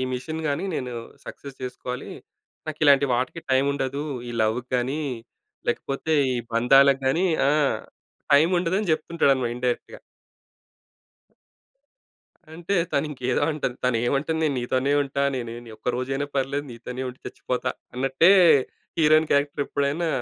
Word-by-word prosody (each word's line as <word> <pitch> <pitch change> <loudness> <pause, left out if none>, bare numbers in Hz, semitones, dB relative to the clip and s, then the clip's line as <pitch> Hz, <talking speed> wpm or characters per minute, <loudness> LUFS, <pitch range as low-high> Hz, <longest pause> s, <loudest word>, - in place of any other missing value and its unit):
Machine 155 +6 -5
గాని 145 +7 -1
నేను 125 -4 -3 0.3
success 140 -2 -9
చేసుకోవాలి. 125 0 -6 0.6
నాకిలాంటి 145 -2 +4
వాటికి 130 +7 -2
టైముండదు. 140 +1 +1 0.3
ఈ - - -5
లవ్‌కి 120 +4 -1
గాని, 130 +5 -1 0.7
లేకపోతే 135 +6 -2 0.2
ఈ - - -1 0.2
బంధాలకు 135 +3 +5
గాని 170 +8 +2 0.2
ఆ! - - +4 0.8
టైముండదని 175 +6 +3
చెప్తుంటాడన్నమాట 140 -7 +1
ఇండైరెక్ట్‌గా. 125 - -3 2.5
అంటే, 175 +4 -3 0.2
తను 140 +2 +1
ఇంకేదో 130 -3 -1
అంటది. 140 -5 -3
తను 125 -2 +2
ఏమంటుంది, 155 +5 0
'నేను 150 -3 +1
నీతోనే 130 +3 0
ఉంటా. 140 0 -2
నేను 120 -2 -4 0.2
ఈ - - -10
ఒక్క - - -5
రోజైనా 135 +3 -2
పర్లేదు 140 +2 -1
నీతోనే 125 +2 -7
ఉండి 125 +1 -10
చచ్చిపోతా' 125 -1 -3 0.2
అన్నట్టే 135 +7 +3 0.7
హీరోయిన్ 155 0 +4
క్యారెక్టర్ 145 0 +1
ఎప్పుడైనా 145 +4 -1
140 Hz, 120 wpm, -24 LUFS, 125-155 Hz, 2.5 s, బంధాలకు